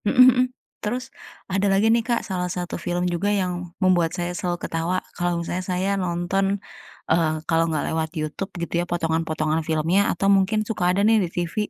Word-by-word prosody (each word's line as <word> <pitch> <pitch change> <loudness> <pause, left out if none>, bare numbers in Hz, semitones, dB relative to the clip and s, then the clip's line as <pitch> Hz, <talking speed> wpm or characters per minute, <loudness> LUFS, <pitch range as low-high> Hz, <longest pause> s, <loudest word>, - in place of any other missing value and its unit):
Mhm 250 +4 +6
mhm. 250 +1 +3 0.4
Terus 250 +5 -3 0.3
ada 195 +1 0
lagi 195 +2 +3
nih, 230 - +3
Kak, 235 0 -1
salah 180 -3 -2
satu 180 0 -4
film 175 0 0
juga 180 +3 0
yang 180 -3 -1
membuat 180 -4 +3
saya 175 0 -2
selalu 175 -2 -2
ketawa 165 +3 -1 0.2
kalau 175 0 -1
misalnya 170 +2 -3
saya 185 +2 0
nonton, 195 +1 0 0.5
eee, 165 -1 +3 0.2
kalau 165 0 +2
nggak 155 -2 -1
lewat 160 0 -1
YouTube, 155 +6 -3
gitu 170 - -4
ya, - - -2
potongan-potongan 160 -2 0
filmnya 160 +4 +2
atau 180 +3 -1
mungkin 215 +3 +1
suka 205 -5 0
ada 185 +2 +2
nih 225 +1 +5
di 180 - -1
TV, 175 -1 -2
180 Hz, 185 wpm, -23 LUFS, 170-195 Hz, 0.5 s, Mhm